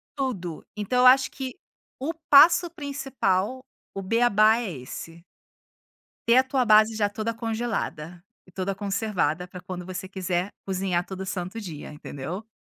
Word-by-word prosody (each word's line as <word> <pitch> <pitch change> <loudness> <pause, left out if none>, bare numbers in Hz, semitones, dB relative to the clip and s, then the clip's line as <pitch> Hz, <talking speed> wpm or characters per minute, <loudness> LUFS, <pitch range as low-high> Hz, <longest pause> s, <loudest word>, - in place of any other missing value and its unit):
tudo. 200 - -3
Então 210 +4 0
eu 250 - +5
acho 260 0 +6
que 260 -2 -6 0.4
o 290 +5 -2 0.2
passo 340 +4 +7
principal, 265 - -2 0.3
o 195 - -3
bê-á-bá 220 0 +4
é 230 -6 -3
esse. 165 +5 -9 1.1
Ter 235 - +7
a 260 - +7
tua 260 -1 0
base 215 0 +5
já 205 -2 +2
toda 220 +2 -3
congelada. 225 -8 -3 0.2
E - - -20
toda 190 +2 -3
conservada 195 -5 -1
pra 180 0 -10
quando 180 -1 -7
você 185 +1 -6
quiser 185 -1 -2
cozinhar 185 -2 -1
todo 190 0 -6
santo 185 +3 -4
dia, 160 -7 -8
entendeu. 150 +7 -7
205 Hz, 150 wpm, -25 LUFS, 180-240 Hz, 1.1 s, passo